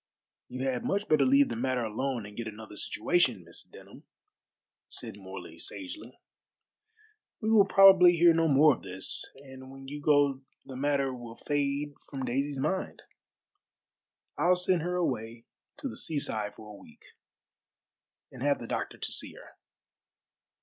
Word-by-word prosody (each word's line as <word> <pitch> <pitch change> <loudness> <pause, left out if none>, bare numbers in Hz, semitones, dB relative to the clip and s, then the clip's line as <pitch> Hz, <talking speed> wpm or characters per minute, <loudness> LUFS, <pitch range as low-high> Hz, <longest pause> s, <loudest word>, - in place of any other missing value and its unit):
"You 130 +1 -5
had 125 -2 -1
much 200 +1 -1
better 155 -3 +4
leave 140 +2 +4
the 115 - -3
matter 125 +1 -1
alone 115 +1 -3
and 105 0 -11
get 115 0 -5
another 110 -1 -9
situation, 120 - 0
Miss 85 0 -5
Denham," - - -15 0.8
said 115 -4 -2
Morley 95 -4 -10
sagely. 290 - -8 1.2
"We 220 0 -1
will 205 -3 +6
probably 190 -3 +8
hear 170 0 +6
no 165 0 +2
more 150 +1 +6
of - - -9
this, 95 0 0
and 130 -1 -12
when 135 0 -11
you 145 +2 -7
go 145 -2 +3 0.2
the 130 - -9
matter 140 0 0
will 120 -2 -9
fade 145 +1 -2 0.2
from 135 -2 -4
Daisy's 135 +3 -2
mind. 155 +7 -2 1.4
I'll 175 +4 +4
send 180 -1 +1
her 180 +2 -2
away 115 -9 -3 0.3
to 280 0 -5
the 255 - -7
seaside 110 -10 -3
for 105 -1 -11
a 100 - -12
week, - - -18 1.3
and 125 - -12
have 145 +1 +2
the 120 - -8
doctor - - -4
to - - -4
see - - -1
her." - - -14
135 Hz, 155 wpm, -29 LUFS, 115-155 Hz, 1.4 s, probably